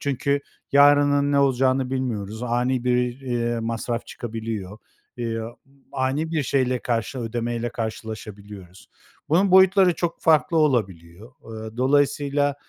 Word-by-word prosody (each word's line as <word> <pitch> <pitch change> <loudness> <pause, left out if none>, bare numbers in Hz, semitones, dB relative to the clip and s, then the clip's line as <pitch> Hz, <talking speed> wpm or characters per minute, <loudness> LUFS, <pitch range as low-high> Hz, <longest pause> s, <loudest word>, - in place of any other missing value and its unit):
çünkü 140 0 -1 0.3
yarının 145 0 +5
ne 140 - +3
olacağını 130 -1 +2
bilmiyoruz. 115 -4 -3
Ani 125 +1 0
bir, 125 0 0
eee, 120 -3 -2
masraf 115 +1 -3
çıkabiliyor, 110 -5 -6 0.4
eee, 115 -2 -3 0.5
ani 140 +4 -1
bir 155 -3 +1
şeyle, 130 -1 0
karşı 115 +2 -2
ödemeyle 120 0 -3
karşılaşabiliyoruz. 105 -4 -8 0.4
Bunun 185 +5 +3
boyutları 190 -1 +5
çok 170 +1 -3
farklı 160 +1 +3
olabiliyor. 105 - -1
Eee, 110 0 -8
dolayısıyla, 145 +2 +1
125 Hz, 115 wpm, -23 LUFS, 115-140 Hz, 0.5 s, yarının